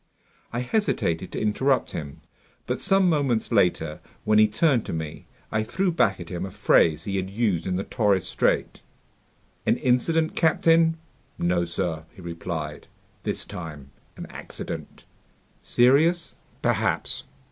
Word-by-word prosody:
I 120 - -2
hesitated 125 - 0
to - - -3
interrupt 130 +6 +1
him. 70 -3 -6 0.4
But - - -2
some 195 -1 +4
moments 140 -10 +1
later, 85 -7 +2 0.2
when 105 0 +4
he 110 - +7
turned 120 +2 +2
to - - -3
me, 80 -2 -5 0.2
I 110 - +1
threw 180 - 0
back 100 - +2
at 85 -2 -8
him 90 -1 -4
a 95 - -4
phrase 80 -3 +3
he 100 -1 -2
had 95 0 -2
used 100 -5 0
in 90 - 0
the 95 - -1
Torres 100 -6 +1
Strait: - - 0 0.8
"An - - +2
incident, 160 +6 +1
captain?" 165 0 +4 0.4
"No, 85 0 +1
sir," 85 -2 -2
he 95 - -12
replied, 80 -3 -5 0.3
"this - - -3
time 75 -5 -8 0.3
an - - -6
accident." - - -7 0.6
"Serious?" 155 +8 +3 0.3
"Perhaps." - - 0
105 Hz, 140 wpm, -25 LUFS, 85-140 Hz, 0.8 s, he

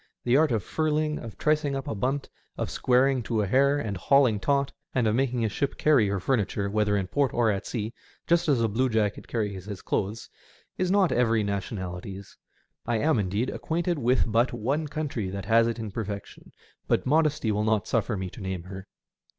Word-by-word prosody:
The 120 +1 +2
art 155 0 +4
of 110 -5 0
furling, 155 - 0
of 115 -2 -9
tricing 150 -2 +1
up 135 +1 -4
a - - -2
bunt, 130 +7 -1 0.3
or - - -1
squaring 130 +1 +2
to 110 -2 -1
a - - 0
hair, 140 +7 +3
of 110 -8 -3
hauling 130 -1 +3
taut, 140 +3 +1 0.2
and 125 -3 +2
of 110 - +2
making 125 -1 +1
a - - +2
ship 135 +6 -2
carry 140 -9 +4
her 100 0 -1
furniture, 100 -2 0
whether 105 -1 +2
in 95 - -1
port 135 +6 0
or 115 -2 +3
at 100 0 -3
sea, 110 -1 -3 0.3
just 170 -1 +2
as 125 -5 +3
a - - +3
bluejacket 110 -2 0
carries 100 -5 -3
his 100 -3 -7
clothes, 105 +3 -2 0.5
is 185 -1 -1
not 195 -2 +3
every 115 -3 +2
nation 100 +1 -3
ality's. 95 +1 -7 0.5
I 120 -1 0
am, 150 +2 +2
indeed, 100 +6 -1
acquainted 170 0 -2
with 125 0 +3
but 115 +3 +1
one 135 +7 -1
country 145 -9 -3
that 100 0 -5
has 115 +2 +4
it 115 - -2
in 110 -3 -5
perfection; 100 -1 -6 0.4
but - - +1
modesty 150 -5 +2
will 105 0 0
not 110 -1 +1
suffer 110 -2 0
me 95 -1 -4
to 115 - -11
name 95 -2 -4
her. 95 +1 -9
115 Hz, 200 wpm, -27 LUFS, 105-140 Hz, 0.5 s, art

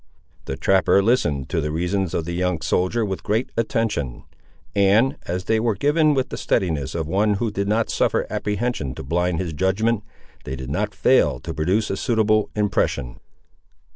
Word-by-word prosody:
The 65 - -4
trapper 95 +5 +3
listened 75 - +1
to - - 0
the 75 - -2
reasons 90 +3 -1
of 80 - -1
the 85 - -4
young 90 -2 -1
soldier 90 +8 +1
with 95 -2 -4
great 110 +5 -1
attention; 115 - -1 0.5
and, 105 +8 +4
as 90 +2 -2
they 110 +2 +1
were 115 -2 +1
given 150 - +3
with 130 -1 0
the - - -5
steadiness 75 - -1
of 80 -2 -1
one 100 +4 +2
who 110 +2 -1
did 100 0 -2
not 110 +2 +1
suffer - - +1
apprehension 105 - -2
to - - -7
blind 90 +4 0
his 85 -4 -3
judgment, 100 +6 +1 0.4
they 65 - -5
did 65 0 -6
not - - -2
fail 60 - +3
to - - -5
produce 95 +8 0
a 95 - -2
suitable 110 -3 +2
impression. 105 - -1
95 Hz, 175 wpm, -22 LUFS, 80-110 Hz, 0.5 s, and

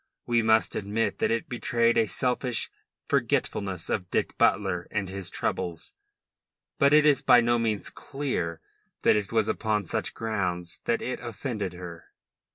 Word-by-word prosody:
We 120 -1 +2
must 110 0 +3
admit 105 +3 -1
that - - +2
it 115 0 -1
betrayed 115 -1 +1
a 115 - +3
selfish 125 0 0 0.4
forgetfulness 95 -4 0
of 90 -4 -2
Dick - - -1
Butler 95 -3 +2
and 105 -2 -2
his 95 -1 -3
troubles, 85 -2 -3 0.9
but 140 -1 +5
it 150 0 +6
is 145 -3 +5
by 125 - +6
no 120 0 +2
means 110 -3 -1
clear 125 - -3 0.4
that - - +5
it 105 -2 -1
was 110 -2 +2
upon 105 -2 0
such - - -2
grounds 90 -6 -2
that 115 - 0
it 125 - -3
offended 115 -5 -4
her. 90 -2 -9
110 Hz, 155 wpm, -27 LUFS, 95-120 Hz, 0.9 s, it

